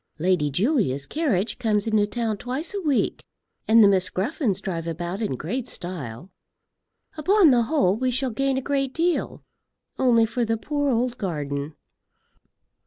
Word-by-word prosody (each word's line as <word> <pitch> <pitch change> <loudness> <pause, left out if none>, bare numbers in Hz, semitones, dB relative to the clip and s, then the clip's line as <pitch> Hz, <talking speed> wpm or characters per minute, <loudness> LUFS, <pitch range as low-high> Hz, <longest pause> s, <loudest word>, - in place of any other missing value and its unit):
"Lady 170 -2 +1
Julia's 180 - 0
carriage 250 - -1
comes 215 -4 +1
into 215 -2 +2
town 225 -1 -2
twice 265 - -4
a 400 - -3
week, 295 -7 0 0.4
and 225 0 +7
the - - +7
Miss 185 -2 +3
Gruffens 205 - -1
drive 170 -4 -4
about 175 +4 -4
in 210 - -1
great 230 - -4
style. 175 -3 -6 0.9
Upon 360 +1 +5
the 245 -2 +4
whole, 270 -10 +2
we 255 +2 0
shall 260 +1 -1
gain 270 +3 0
a 265 - -2
great 275 -1 -1
deal; 340 +1 -1 0.6
only 235 -3 +4
for 235 +2 -2
the 225 0 0
poor 290 +4 -1
old 245 0 0
garden. 145 -4 -3
225 Hz, 155 wpm, -24 LUFS, 185-265 Hz, 0.9 s, and